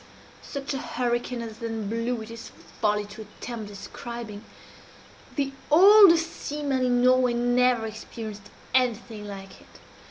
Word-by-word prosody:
"Such 280 -1 -5
a 270 - -2
hurricane 240 -2 -2
as 225 -1 -8
then 225 -2 -4
blew 230 +1 -2
it 220 - -10
is 230 0 -9 0.3
folly 210 -1 +2
to 205 +2 -10
attempt 220 +1 -7
describing. 210 +1 -8 0.9
The 275 -2 0 0.2
oldest 340 -1 +7
seaman 285 -4 -2
in 245 -1 +2
Norway 255 -1 +4
never 245 -1 +2
experienced 220 -1 -8 0.2
anything 230 -4 0
like 195 -1 -9
it. - - -19
235 Hz, 130 wpm, -26 LUFS, 220-255 Hz, 0.9 s, oldest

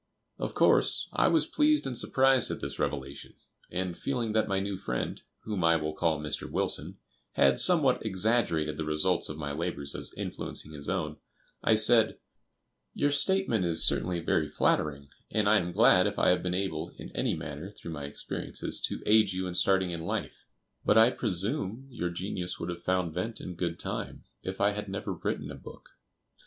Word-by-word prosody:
Of - - -4
course, - - +3
I - - +3
was - - +3
pleased 300 0 +2
and 130 - -3
surprised 130 +2 +3
at - - -4
this - - -5
revelation, 70 -1 -4 0.3
and, 90 0 -3
feeling 120 -2 -2
that 110 0 +1
my 100 -2 0
new 100 0 -3
friend, 75 -11 -4 0.2
whom 105 -5 -3
I 85 0 +5
will 75 -1 -2
call 80 -2 0
Mr. 75 -1 -3
Wilson,[B] - - +1 0.4
had 70 -1 +3
somewhat 155 -8 +4
exaggerated 95 -7 0
the 80 - -2
results 80 +4 +1
of 75 - -6
my 75 -2 -4
labors 70 -2 -2
as - - -3
influencing 75 - -3
his 75 -2 -5
own, 75 -5 -2 0.5
I 110 - +4
said: 110 0 +4 0.8
"Your 145 - +1
statement 145 - +2
is 85 -2 +4
certainly 90 -1 +1
very - - 0
flattering, 70 -2 0 0.2
and 105 -1 0
I 110 +1 +5
am 90 0 -3
glad - - +5
if - - -4
I - - +3
have 90 - +2
been 90 0 -2
able 90 -5 -3
in - - -10
any - - 0
manner, 75 +5 -7
through 85 -4 -10
my 75 -3 -6
experiences, 70 - -1
to - - -6
aid 110 -1 +4
you 95 0 -3
in 90 - -4
starting 95 0 +2
in 85 -1 -5
life; - - -5 0.4
but 105 - +3
I 115 +2 +7
presume 110 - 0
your 90 -8 -3
genius 90 0 -4
would 85 - -4
have 85 0 -6
found 90 -3 -1
vent 110 +7 -4
in 90 - -7
good 85 -1 -3
time - - -5 0.2
if 95 0 -6
I 100 +1 +3
had 105 0 -5
never 100 +1 -4
written - - -4
a - - -7
book." - - -13
90 Hz, 190 wpm, -29 LUFS, 80-110 Hz, 0.8 s, I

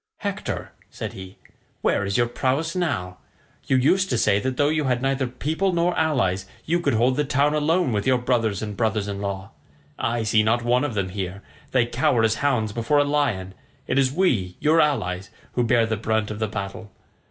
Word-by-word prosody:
"Hector," - - -4 0.2
said - - -6
he, 95 0 -10 0.5
"where - - +2
is 100 -1 -1
your 120 - +4
prowess 135 +7 -1
now? 110 - -2 0.5
You 130 - +3
used 185 +9 +3
to 125 - +1
say 105 -2 +3
that 130 +3 -3
though 145 0 +3
you 155 -1 0
had 125 -2 +1
neither 135 -1 0
people 160 +10 -1
nor 170 +1 +1
allies 95 - +1 0.2
you 170 +3 +1
could 170 - +1
hold 125 +3 +2
the 150 - +2
town 145 +1 +2
alone 160 +1 +2
with 105 0 -1
your 130 -1 +4
brothers 115 -5 0
and 105 -1 -5
brothers 110 -1 0
in 100 -1 -4
law. 95 -1 -4 0.5
I 115 0 0
see 110 0 +3
not 115 +3 +1
one 125 +2 +2
of 140 -7 -2
them 95 -2 -1
here; 95 0 -5 0.3
they 125 -3 +3
cower 120 -1 +1
as 110 0 +2
hounds 125 -7 +1
before 120 +6 +1
a 145 - +5
lion; 135 -11 0 0.3
it 130 - +1
is 130 -1 +3
we, 125 - +1
your 160 +2 +4
allies, 95 -11 -1 0.2
who 120 - 0
bear 115 0 +3
the 110 -1 -2
brunt 110 0 -1
of 105 - -6
the 110 - 0
battle. 100 0 -6
120 Hz, 205 wpm, -23 LUFS, 105-145 Hz, 0.5 s, a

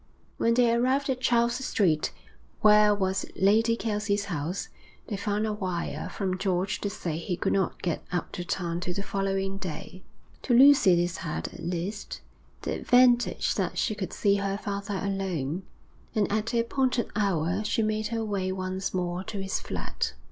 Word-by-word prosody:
When 230 0 +2
they 240 -1 +4
arrived 260 +4 +2
at 255 -1 -3
Charles 240 0 +2
Street, 165 -11 +1 0.5
where 210 0 +7
was 190 -1 0
Lady 225 +4 +4
Kelsey's 210 -2 -1
house, 175 0 -3 0.4
they 210 - -4
found 205 +1 -1
a 215 - -1
wire 185 -4 -3
from 185 -2 -2
George 190 0 0
to 205 - -1
say 170 -5 -4
he 175 +1 -3
could - - 0
not 190 -2 -1
get 170 -3 -1
up 175 -1 -2
to 175 - -4
town 175 -2 -2
till 180 0 -3
the 200 - -2
following 195 0 -1
day. 185 +1 -6 0.4
To 245 - +2
Lucy 265 -8 +7
this 175 0 0
had, 165 -4 -4
at - - -12
least, 180 +5 -4 0.4
the - - -1
advantage 245 -1 +3
that - - -2
she 225 - +1
could 200 -3 -4
see 200 -1 +2
her 200 0 -1
father 200 -1 -3
alone, 185 -4 -2 0.5
and 210 -2 +1
at 215 +1 0
the 235 0 +2
appointed 255 0 0
hour 190 -2 +1
she 220 +1 +1
made 215 0 0
her 225 0 -2
way 195 -3 -1
once 185 0 -3
more 180 0 -1
to 205 - -5
his 195 0 -2
flat. - - -3
200 Hz, 175 wpm, -27 LUFS, 185-220 Hz, 0.5 s, where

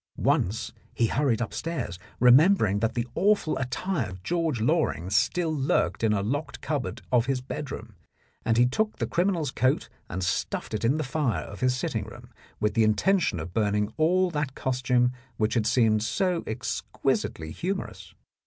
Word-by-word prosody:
Once 105 +5 +1 0.2
he 115 - +3
hurried 120 -1 +1
upstairs, 120 - -3 0.2
remembering 125 - +5
that 115 +1 0
the 120 -1 0
awful 200 -3 +2
attire 130 - -2
of 95 -1 -10
George 165 - 0
Loring 110 - 0
still 160 +11 +2
lurked 140 -5 0
in 110 - +3
a 100 -2 +1
locked 140 +7 -3
cupboard 145 -4 -3
of 120 -1 +3
his 135 -2 +1
bedroom, 125 -4 -6 0.5
and 115 0 +1
he 120 - +6
took 215 - 0
the - - -1
criminal's 175 -6 0
coat 130 +1 +1 0.2
and 90 +1 -3
stuffed 85 - -2
it 110 - -2
in 130 +6 +3
the 155 - -1
fire 135 -3 -1
in 100 - -8
his 125 +2 +1
sitting - - -2
room, - - -12 0.3
with 105 - +1
the 115 - +3
intention 110 - +2
of 80 +3 -6
burning 105 0 0
all 180 +3 +3
that 150 -4 -2
costume 125 -1 +1 0.3
which 110 0 +1
had 115 -3 +1
seemed 110 -3 +3
so 180 - 0
exquisitely 110 -8 -2
humorous. 190 - -5
125 Hz, 165 wpm, -27 LUFS, 110-155 Hz, 0.5 s, he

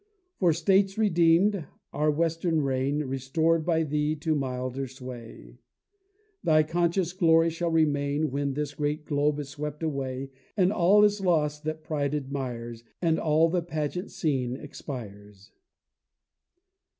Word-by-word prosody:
For 180 -3 +4
States 190 +5 +2
redeem'd 175 -2 +3 0.3
our 150 +1 +1
western 165 +1 +1
reign 135 +2 0
Restor'd 150 +5 0
by 160 -1 +1
thee 150 0 0
to 155 +1 -1
milder 130 -1 -3
sway, 120 - -10 0.8
Thy 155 -1 +4
conscious 175 +2 0
glory 165 -2 +4
shall 170 +1 -2
remain 145 -2 +1
When 140 0 -1
this 150 -1 -3
great 150 0 -2
globe 145 -1 +1
is 145 -2 -5
swept 150 +2 -6
away 135 -3 -3 0.3
And 190 0 +3
all 195 +4 +5
is 205 -1 +3
lost 150 -4 +1
that 155 0 -4
pride 145 -2 -1
admires, 125 -5 -5 0.2
And 165 -2 +1
all 160 +1 +3
the 175 +1 0
pageant 165 +3 -3
scene 130 -6 -1
expires. 105 -8 -9
150 Hz, 130 wpm, -27 LUFS, 135-165 Hz, 0.8 s, all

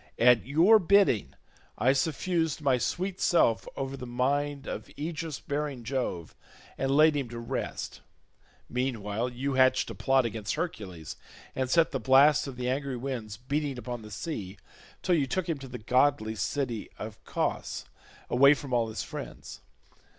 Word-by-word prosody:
At 120 0 +5
your 175 +10 +6
bidding 195 - +3 0.4
I 130 +2 +4
suffused 160 +2 0
my 135 -4 +2
sweet 185 +7 -2
self 115 -10 +3
over 135 0 -3
the 125 -2 -7
mind 140 +3 -1
of - - -6
aegis 160 0 -4
bearing 145 -3 -3
Jove, 115 - -3 0.4
and 135 - -1
laid 155 +2 +5
him 135 -4 -2
to 120 - -7
rest; 115 0 -4 0.7
meanwhile 120 -2 -2
you 130 +3 -3
hatched 130 0 +3
a - - -5
plot 135 -2 +2
against 110 -2 -3
Hercules, 100 - -5 0.4
and 130 -1 -1
set 165 +3 +4
the 135 - -2
blasts 140 +3 +5
of 135 - -6
the 125 0 -3
angry 135 0 -1
winds 120 -5 -5
beating 140 +2 -2
upon 125 -1 -5
the 105 - -10
sea, 105 - -5 0.5
till 185 - +2
you 145 -5 +2
took 185 +6 -1
him 160 -4 -2
to 135 - -8
the 125 -1 -7
goodly 125 -1 +2
city 120 0 -2
of 110 0 -8
Cos, - - -2 0.4
away 140 +4 +6
from 140 -2 -7
all 115 -2 +2
his 110 - -4
friends. - - -8
135 Hz, 160 wpm, -29 LUFS, 120-145 Hz, 0.7 s, your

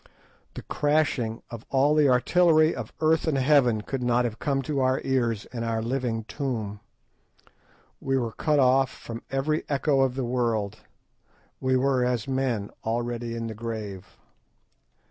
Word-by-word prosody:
The - - -7
crashing 145 -6 0
of 115 -1 -7
all 140 +2 +3
the 150 -2 +4
artillery 155 +5 +4
of - - -6
earth 160 +1 +2
and 150 -3 +1
heaven 130 -5 +3
could 130 +4 -4
not 120 0 +2
have 115 -2 -4
come 135 -1 0
to 140 +1 -2
our 130 0 +2
ears 120 -5 0
in 115 -2 -3
our 115 -1 -1
living 120 -2 -2
tomb. 110 -5 -4 1.2
We 135 0 0
were 120 -3 -1
cut 150 +6 0
off 130 0 +4
from 115 -2 -8
every 140 +4 0
echo 140 -1 +2
of 130 -2 +1
the 130 -2 -2
world—we 120 +2 -3
were 130 -1 +2
as 125 -2 -1
men 130 -6 -1
already 120 +1 -2
in 115 0 -4
the 115 - -4
grave. 110 -4 -6
125 Hz, 150 wpm, -26 LUFS, 115-135 Hz, 1.2 s, the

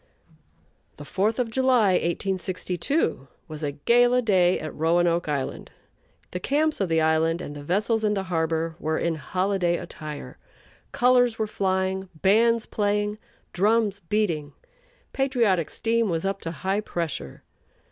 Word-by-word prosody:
The 145 - -9
Fourth 205 +8 0
of 245 -3 -1
July, 250 -5 +3
1862, 185 - -1 0.2
was 155 0 -8
a 145 -2 -2
gala 245 - +3
day 185 -4 +3
at 155 - -6
Roanoke 170 +1 +1
Island. 140 -3 -3 0.6
The 180 - -3
camps 300 - 0
of 190 - 0
the 165 0 +2
island 160 +1 +2
and 145 -4 -7
the 145 - -8
vessels 210 +7 0
in 210 -1 +2
the 195 - -1
harbor 165 -2 -1
were 155 0 -1
in 170 - 0
holiday 180 +2 0
attire. 155 -4 -8 0.5
Colors 245 -2 +3
were 220 - 0
flying, 190 -2 -1
bands 225 +4 +3
playing, 210 0 -1 0.3
drums 210 +1 +2
beating, 165 -7 -1 0.6
patriotic 235 - +1
steam 230 -1 0
was 165 +1 -1
up 195 0 -2
to 165 - -4
high 190 +4 -1
pressure. 160 - -5
190 Hz, 135 wpm, -25 LUFS, 165-220 Hz, 0.6 s, July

